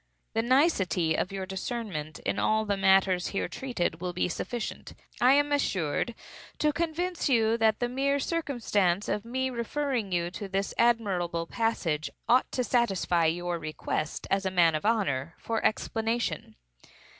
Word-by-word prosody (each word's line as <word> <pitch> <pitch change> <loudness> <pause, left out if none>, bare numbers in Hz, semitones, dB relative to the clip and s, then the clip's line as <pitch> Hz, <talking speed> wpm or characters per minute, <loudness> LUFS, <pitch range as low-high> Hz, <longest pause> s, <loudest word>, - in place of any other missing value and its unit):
The 225 - +2
nicety 205 - +2
of 180 - -1
your 195 -1 -4
discernment 190 -6 -4
in - - 0
all 220 0 +2
the 205 -1 0
matters 190 -2 +3
here 200 - -2
treated, 175 -10 -3
will 180 -1 -3
be 180 - 0
sufficient, 235 +6 -5 0.3
I 250 +2 +7
am 290 +1 +3
assured, 225 - 0 0.4
to 300 -1 +2
convince 335 +1 -1
you 225 -3 +3
that 220 -1 +3
the 245 - 0
mere 275 +3 +1
circumstance 235 - 0
of 210 - -1
me 260 +2 -1
referring 240 -2 -2
you 175 -1 0
to 200 +2 -6
this 195 +1 -2
admirable 190 -8 +1
passage, 165 -8 -1 0.2
ought 250 +2 +3
to 250 - 0
satisfy 195 -9 +1
your 175 +1 -1
request, 155 -1 -3
as 195 0 +2
a 190 - 0
man 175 -3 +4
of 155 +5 -2
honor, 165 - 0
for 225 -1 -3
explanation. 225 - -1
210 Hz, 155 wpm, -28 LUFS, 175-245 Hz, 0.4 s, I